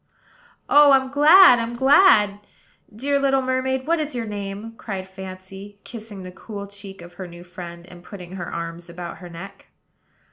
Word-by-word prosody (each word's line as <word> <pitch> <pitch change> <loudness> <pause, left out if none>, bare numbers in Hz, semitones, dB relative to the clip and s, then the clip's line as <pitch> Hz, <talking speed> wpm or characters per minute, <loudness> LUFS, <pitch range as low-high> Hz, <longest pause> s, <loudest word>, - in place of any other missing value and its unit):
"Oh, 290 -1 +6
I'm 265 -1 +2
glad, 300 -1 +7
I'm 230 +1 -4
glad! 250 - +5 0.5
Dear 280 +6 -1
little 270 -1 +2
mermaid, 260 0 -1
what 335 +1 +1
is 300 -3 -4
your 235 -2 -3
name?" 205 +1 -6
cried 190 -3 -6
Fancy, 190 +1 -10
kissing 215 -4 -9
the 185 - -8
cool 200 +2 -8
cheek 200 -2 -11
of 175 0 -13
her 185 +1 -8
new 175 0 -12
friend, 175 -1 -10
and 180 -1 -15
putting 180 -2 -11
her 185 -2 -6
arms 170 +1 -6
about 170 0 -8
her 180 - -10
neck. 180 +4 -11
200 Hz, 170 wpm, -22 LUFS, 180-260 Hz, 0.5 s, glad